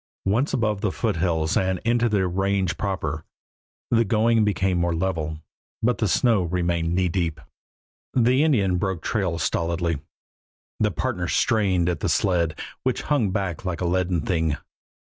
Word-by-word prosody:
Once 115 +9 +1
above 105 -5 0
the 105 -3 0
foothills 85 -7 0
and 95 0 +1
into 120 0 +2
the 100 -3 +2
range 95 -1 0
proper, 80 -7 -3 0.7
the 115 -1 +4
going 115 +1 +3
became 95 -3 +1
more 85 -1 +1
level, 80 -3 -2 0.5
but 120 -1 +2
the 110 - +2
snow 115 -1 +3
remained 85 -1 0
knee 90 0 +2
deep. 85 -3 -1 0.8
The 125 +3 +4
Indian 100 - +2
broke 95 -3 -2
trail 95 -7 -1
stolidly; 85 -1 -1 0.8
the - - +3
partners - - -2
strained 95 -6 +2
at 90 - -1
the - - -1
sled, 85 -4 +1 0.2
which 130 -1 -1
hung 135 -9 +1
back 95 -4 -2
like 90 -4 -3
a - - 0
leaden 90 -1 +1
thing. 80 -3 0
95 Hz, 150 wpm, -24 LUFS, 85-105 Hz, 0.8 s, the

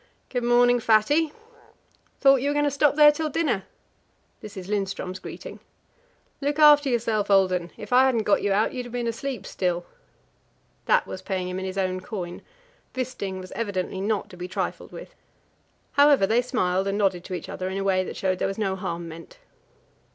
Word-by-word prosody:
"Good 245 -2 -2
morning, 245 0 +4
Fatty!" 230 +9 +3 0.9
"Thought 275 -1 +6
you 280 - 0
were 290 - -1
going 290 0 +2
to 290 - +1
stop 285 +1 +2
there 295 0 +8
till 310 +1 -3
dinner." 270 - -1 0.7
This 210 -2 -10
is 185 -1 -7
Lindström's 195 -2 -3
greeting. - - -9 0.8
"Look 285 +1 -1
after 295 -2 +6
yourself, 220 -4 0
old 190 -2 +4
'un. 175 -1 -2
If 210 +3 -6
I 255 +1 +6
hadn't 240 -4 +1
got 205 - +2
you 205 - 0
out, 205 +3 +1
you'd 250 -2 -5
have - - -12
been 245 0 -3
asleep 235 0 -4
still." 175 -2 -2 1.0
That - - +3
was 185 - -7
paying 185 -1 -3
him 185 +1 -4
in 190 - -5
his 190 +1 -5
own 185 -1 -1
coin: 180 -3 -6 0.5
Wisting 245 -7 -4
was 185 0 -10
evidently 190 -4 -3
not 210 0 -1
to 180 - -12
be 180 +1 -5
trifled 190 0 -4
with. - - -10 0.8
However, 285 -7 +5
they 225 +4 +2
smiled 195 -7 0
and 200 +1 -1
nodded 190 -4 +1
to 185 - -4
each 175 - -7
other 185 0 -4
in 190 - -4
a 195 - -2
way 190 -1 +2
that - - -7
showed 190 - 0
that 185 - -4
there - - 0
was 195 - -4
no 195 -3 -1
harm 170 -2 -5
meant. 165 - -11
205 Hz, 200 wpm, -25 LUFS, 185-255 Hz, 1.0 s, there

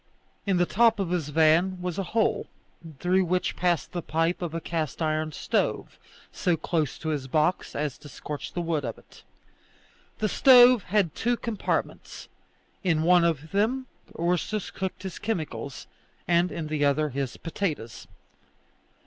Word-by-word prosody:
In 195 -2 +2
the 175 - +3
top 225 +3 +3
of 185 -3 -1
his 165 -5 -1
van 165 +5 +3
was 180 0 -3
a 190 -3 -3
hole, 225 -1 +1 0.5
through 185 +5 +2
which 180 +1 0
passed 175 -6 0
the 175 - -3
pipe 165 +3 0
of 170 -2 -4
a - - -1
cast 160 -3 -3
iron 155 -1 0
stove; - - -2 0.3
so 175 -2 0
close 155 -3 -1
to 160 - -4
his 145 -4 -2
box 155 +6 0
as 145 -3 -3
to 145 - -12
scorch 145 +1 -7
the 175 - -2
wood 165 -3 -1
of - - -4
it. - - -18 1.0
The 215 - 0
stove 245 0 +7
had 190 -4 +1
two 240 +1 0
compartments; 230 -4 -3 0.5
in 165 -4 +2
one 175 +1 +5
of 160 -2 -1
them 230 +7 +1 0.3
Ursus 180 +4 -1
cooked 190 0 -5
his 190 -2 -6
chemicals, 145 - -4 0.4
and 175 +1 +3
in 165 - -4
the 150 -1 -1
other 150 +2 +2
his 135 -1 -4
potatoes. 155 - -4
170 Hz, 155 wpm, -26 LUFS, 155-190 Hz, 1.0 s, stove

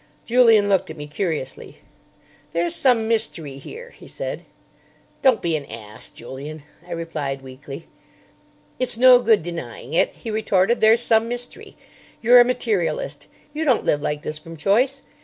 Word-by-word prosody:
Julian 225 -4 +5
looked 195 -4 +1
at 160 - -8
me 150 - -6
curiously. 150 -3 -4 0.8
"There's 170 +1 0
some 240 -4 +2
mystery 165 -11 -2
here," 480 - -10
he - - -15
said. - - -6 0.8
"Don't 260 -4 +3
be 170 -2 +1
an 145 -2 -4
ass, 110 -1 -10
Julian," 140 +5 -9 0.2
I 175 - -5
replied 150 -5 -4
weakly. 135 +3 -10 0.9
"It's 250 -2 +1
no 250 0 +8
good 225 -7 +3
denying 155 -5 -7
it," 165 - +3
he 225 - -7
retorted; 215 0 +1
"there's 225 +2 +5
some 225 -1 +2
mystery. 245 +1 -7 0.4
You're 245 +2 +7
a - - +9
materialist. 180 - -2 0.3
You 310 +2 -2
don't 260 -7 +2
live 145 - +1
like 150 0 -3
this 155 0 -3
from 165 +1 -11
choice. 250 - +1
180 Hz, 155 wpm, -22 LUFS, 150-235 Hz, 0.9 s, a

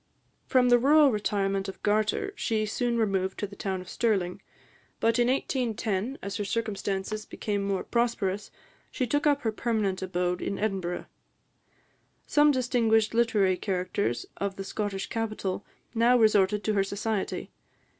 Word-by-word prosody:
From 250 -1 +4
the 245 0 +6
rural 290 +2 +6
retirement 195 -2 -1
of 195 - -10
Gartur, 215 - +1
she 220 - 0
soon 235 +2 -1
removed 195 -4 0
to - - -2
the 200 0 -10
town 190 -2 -3
of 185 - -12
Stirling; 190 -5 0 0.6
but 230 +1 +2
in 240 - +4
1810, 240 -3 -1
as 200 0 -4
her 205 - -2
circumstances 205 -1 -2
became 205 -2 -3
more 195 -1 -1
prosperous, 215 -4 -1 0.4
she 255 - -1
took 290 +5 +1
up 290 -1 +3
her 220 - +1
permanent 215 -4 -1
abode 180 -1 -1
in 200 - -2
Edinburgh. 190 -4 -2 1.2
Some 295 0 +4
distinguished 230 -5 +2
literary 210 -5 +3
characters 185 - -1
of 200 -1 -2
the 195 - -5
Scottish 195 -1 -3
capital 215 -4 -3 0.3
now 235 +2 +4
resorted 210 -2 +3
to 215 - +1
her 195 -1 +3
society. 200 +1 -3
210 Hz, 145 wpm, -28 LUFS, 195-235 Hz, 1.2 s, the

